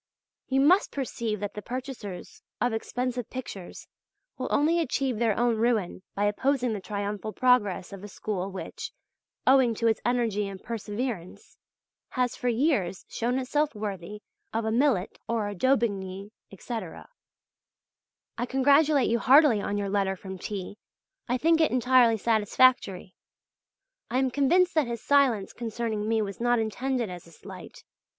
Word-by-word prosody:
You 270 0 +2
must 360 +8 +4
perceive 230 -6 -3
that 205 -1 -3
the 210 - -6
purchasers 245 -6 -7 0.2
of 245 +1 +1
expensive 245 +1 -3
pictures 205 -8 -8 0.5
will - - -4
only 320 +4 +2
achieve 265 -6 -1
their 225 -3 +1
own 240 -1 +2
ruin 220 -6 0
by 205 - +1
opposing 245 +3 +1
the 210 - -3
triumphal 205 +2 -4
progress 210 -7 +2
of 195 0 -9
a - - -6
school 195 -2 -4
which, 190 -1 -7 0.5
owing 260 -3 +5
to 230 - -2
its 225 -1 +2
energy 230 -4 0
and 195 -1 -7
perseverance, 225 - -5 0.5
has 250 -1 -1
for 245 - -1
years 235 - 0
shown 245 +2 -1
itself 290 +2 0
worthy 205 -1 -6 0.3
of 225 0 -2
a 220 - 0
Millet 235 -6 +1
or 225 -3 -1
a 205 - -4
Daubigny, 200 -4 0 0.2
etc. 200 -2 -7 1.3
I 240 - -1
congratulate 280 +2 +4
you 235 - +1
heartily 270 -5 +6
on 205 +1 -2
your 200 -1 -2
letter 195 -1 0
from 190 0 -8
T. 200 +1 -6 0.5
I 250 - +2
think 325 +4 +3
it 315 - +4
entirely 250 -2 +4
satisfactory. 215 -3 +2 1.0
I 245 - 0
am 260 -1 +1
convinced 345 +8 +3
that 310 -5 +2
his 235 -1 -5
silence 265 -8 +2
concerning 225 -2 -3
me 225 -1 +2
was 200 -1 -6
not 240 0 +3
intended 235 0 -1
as 175 -1 -9
a - - -16
slight. 160 - -12
230 Hz, 150 wpm, -27 LUFS, 205-255 Hz, 1.3 s, heartily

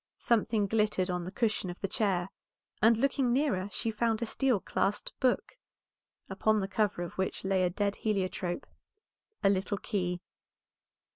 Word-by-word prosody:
Something 220 -2 +2
glittered 210 -3 +1
on 180 -1 -2
the 185 - -5
cushion 210 -3 0
of 175 - -7
the 195 - -1
chair, 190 -3 0 0.5
and 225 +1 +6
looking 265 0 +2
nearer 245 -8 +1
she 225 - -2
found 225 0 +1
a 235 - -1
steel 255 -1 +1
clasped 200 +2 -1
book, 260 - 0 0.7
upon 215 0 +2
the 195 - -1
cover 205 -2 0
of 175 - -8
which 190 - -1
lay 190 -1 +2
a 180 - +3
dead 200 +3 -1
heliotrope, 185 -4 -1 0.8
a 195 - +6
little 195 +1 0
key. 180 -3 -2
205 Hz, 155 wpm, -31 LUFS, 185-225 Hz, 0.8 s, and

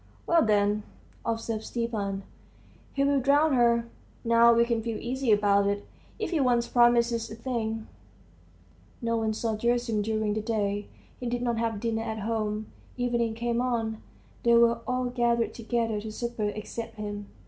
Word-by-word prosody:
"Well, 335 -1 +4
then," 210 -1 +2 0.4
observed 225 -1 -2
Stepan, 210 -5 -3 0.7
"he'll 280 0 +2
drown 285 +3 +3
her. 235 -2 +3 0.4
Now 235 0 +6
we 235 0 +4
can 235 -1 0
feel 225 -1 -3
easy 255 0 -1
about 200 -1 +4
it. 200 0 -1 0.3
If 435 - -3
he 330 - +1
once 245 -3 +2
promises 235 -1 +3
a 220 - -7
thing.. 225 -2 -3 0.6
." 85 +2 -30
No 230 0 +1
one 220 -1 0
saw 225 0 -1
Gerasim 235 -1 0
during 215 0 0
the 215 - -1
day. 205 -2 -1 0.3
He 245 - -4
did 240 0 -1
not 235 -2 0
have 225 -2 -1
dinner 225 0 -1
at 220 -1 -4
home. 215 0 -2 0.3
Evening 235 -2 0
came 235 +1 0
on; 225 -3 -1 0.4
they 235 0 +4
were 235 0 +5
all 255 0 0
gathered 240 -1 +1
together 230 -2 -1
to 220 0 -6
supper, 235 -1 -3
except 220 +2 -6
him. 205 -1 -5
230 Hz, 160 wpm, -28 LUFS, 215-240 Hz, 0.7 s, Now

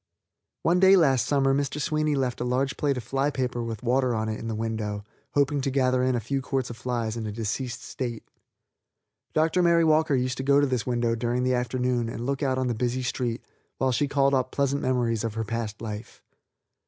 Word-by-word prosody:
One 175 +2 +3
day 190 +1 +7
last 135 - +3
summer 135 -2 +3
Mr. 140 +1 -1
Sweeney 155 0 0
left 130 -3 -1
a - - +1
large 130 +3 0
plate 140 -3 0
of 125 - -4
fly 135 +4 0
paper 125 -3 -2
with 115 -1 -5
water 125 0 +2
on 110 0 -1
it 110 - -3
in 115 - -6
the 110 - -2
window, 110 -2 -3 0.3
hoping 145 0 +2
to 135 - 0
gather 130 -1 +2
in 130 0 +2
a - - +1
few 135 +5 -2
quarts 130 -1 -2
of 115 - -9
flies 120 -3 -2
in 115 -2 -4
a - - -3
deceased 120 +3 -3
state. 120 -4 -5 1.1
Dr. 160 +3 +3
Mary 170 -1 +4
Walker 155 -2 +3
used 125 -1 -1
to 130 - -3
go 140 +1 +4
to 145 - +4
this 130 -3 -1
window 120 -1 +1
during 120 +2 -1
the 130 0 +2
afternoon 125 -1 0
and 115 +1 -5
look 140 +1 -1
out 130 -2 +1
on 130 - 0
the 125 - 0
busy 125 +2 -1
street 125 -1 -2 0.3
while 130 0 +1
she 135 +4 +1
called 140 -1 +2
up 130 -1 +1
pleasant 140 0 0
memories 120 -4 0
of 115 -2 -3
her 115 - -1
past 110 -1 -4
life. 110 0 -7
125 Hz, 220 wpm, -26 LUFS, 115-140 Hz, 1.1 s, day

